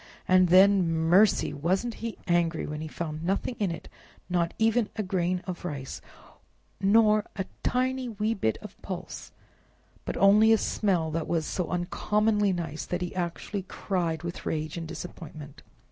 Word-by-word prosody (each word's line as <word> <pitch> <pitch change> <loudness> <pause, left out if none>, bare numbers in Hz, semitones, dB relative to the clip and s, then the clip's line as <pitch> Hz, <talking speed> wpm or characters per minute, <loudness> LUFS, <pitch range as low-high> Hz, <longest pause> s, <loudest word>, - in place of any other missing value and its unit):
And 185 0 +5
then—mercy! 185 0 +4
wasn't 185 +11 0
he 230 -1 -4
angry 170 -2 +1
when 150 0 -5
he 160 - -4
found 155 0 -5
nothing 195 +7 -1
in 200 -3 +1
it—not 170 +1 -4
even 225 0 +2
a 215 - -1
grain 185 -1 -1
of 180 -2 -6
rice, 140 -6 -5 0.8
nor 210 +1 +4
a 195 - -2 0.2
tiny 255 0 0
wee 215 0 -1
bit 110 - 0
of - - -11
pulse, - - -7 0.7
but - - -4
only 210 +3 +6
a 225 - +6
smell 180 -8 0
that 160 0 -2
was 165 -2 0
so 180 -3 -2
uncommonly 210 +3 +1
nice 165 -4 -3
that 180 0 -3
he 180 - -5
actually 185 +3 -3
cried 175 -4 -2
with 170 0 -5
rage 155 -1 -3
and 165 -1 -5
disappointment. 155 -4 -9
180 Hz, 150 wpm, -27 LUFS, 165-210 Hz, 0.8 s, only